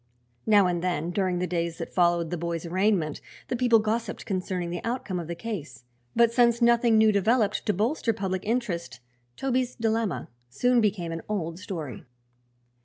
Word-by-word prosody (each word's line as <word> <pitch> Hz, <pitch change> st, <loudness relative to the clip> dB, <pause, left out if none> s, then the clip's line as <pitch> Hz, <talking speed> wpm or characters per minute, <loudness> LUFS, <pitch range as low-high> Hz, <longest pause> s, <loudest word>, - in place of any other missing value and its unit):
Now 205 Hz, -3 st, +6 dB
and 175 Hz, -1 st, 0 dB
then, 175 Hz, -2 st, -1 dB
during 185 Hz, -1 st, 0 dB
the 180 Hz, -, 0 dB
days 170 Hz, -1 st, -2 dB
that 165 Hz, -, -6 dB
followed 175 Hz, -2 st, +2 dB
the -, -, 0 dB
boy's 170 Hz, 0 st, -3 dB
arraignment, 180 Hz, -3 st, 0 dB, 0.3 s
the -, -, 0 dB
people 240 Hz, -1 st, +4 dB
gossiped 220 Hz, +2 st, -2 dB
concerning 180 Hz, -3 st, -2 dB
the 175 Hz, -, -4 dB
outcome 230 Hz, -6 st, -2 dB
of 170 Hz, -, -6 dB
the 170 Hz, -, -4 dB
case, 160 Hz, -, -6 dB, 0.3 s
but 235 Hz, 0 st, +4 dB
since 235 Hz, -1 st, +4 dB
nothing 235 Hz, -1 st, +4 dB
new 220 Hz, 0 st, +6 dB
developed 215 Hz, +2 st, +1 dB
to 210 Hz, -, +3 dB
bolster 230 Hz, -, 0 dB
public 190 Hz, -3 st, -3 dB
interest 210 Hz, -, -2 dB, 0.4 s
Toby's 255 Hz, -2 st, -1 dB
dilemma 225 Hz, -3 st, -1 dB, 0.2 s
soon 245 Hz, -, +2 dB
became 190 Hz, -6 st, 0 dB
an 165 Hz, 0 st, -4 dB
old 170 Hz, -5 st, -3 dB
story. 160 Hz, -, -6 dB
195 Hz, 170 wpm, -26 LUFS, 170-230 Hz, 0.4 s, Now